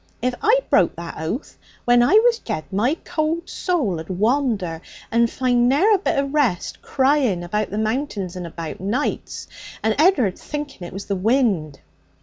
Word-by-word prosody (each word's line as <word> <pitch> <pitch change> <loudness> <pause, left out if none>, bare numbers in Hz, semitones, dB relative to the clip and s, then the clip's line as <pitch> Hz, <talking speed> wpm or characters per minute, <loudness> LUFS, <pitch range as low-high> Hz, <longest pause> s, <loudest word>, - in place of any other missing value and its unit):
If 250 +1 0
I - - +4
broke - - +3
that 170 -1 -7
oath, 165 - -5 0.3
when 240 0 +5
I 245 - +3
was 460 +2 +5
jead, 210 -9 -4
my 240 - +1
cold 325 +2 -1
soul 275 - -1
'ud 160 - -9
wander 205 - 0 0.3
and 235 0 +3
find 245 -1 +2
ne'er 355 +12 +4
a 400 - +3
bit 380 - 0
of 275 0 -1
rest, 255 - 0
crying 260 -9 +1
about 210 +4 -2
the 205 - -4
Mountains 215 -5 -2
and 180 -1 -5
about, 165 -1 -7
nights, 215 +10 -3 0.4
and 220 - +2
Ed'ard 275 - +3
thinking 290 -12 -6
it - - -11
was 195 +1 -6
the 200 - -1
wind. 195 - +1
235 Hz, 170 wpm, -22 LUFS, 185-290 Hz, 0.4 s, when